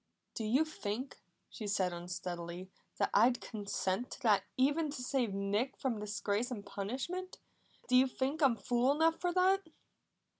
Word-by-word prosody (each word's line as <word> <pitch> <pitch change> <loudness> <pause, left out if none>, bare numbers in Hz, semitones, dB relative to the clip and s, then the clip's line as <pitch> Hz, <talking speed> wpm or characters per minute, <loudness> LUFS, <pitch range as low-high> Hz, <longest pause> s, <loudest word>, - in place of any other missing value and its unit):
"Do 225 - -4
you 260 +9 +3
think," 255 -3 -5 0.3
she 215 - -7
said 190 -3 +1
unsteadily, 175 +1 -5 0.3
"that - - +1
I'd 240 +4 +5
consent 200 +1 -2
to - - -10
that 215 -4 +4
even 295 +4 +2
to 270 -3 -5
save 250 -4 0
Nick 200 +6 -1
from 245 -5 -1
disgrace 210 +2 -1
and 215 -5 -5
punishment? 270 - -4 0.5
Do 255 - +3
you 260 +1 +7
think 270 +4 -2
I'm 265 -5 +5
fool 245 +4 +2
enough 320 +2 +3
for 355 - +1
that?" 375 +2 +4
240 Hz, 155 wpm, -34 LUFS, 200-275 Hz, 0.5 s, you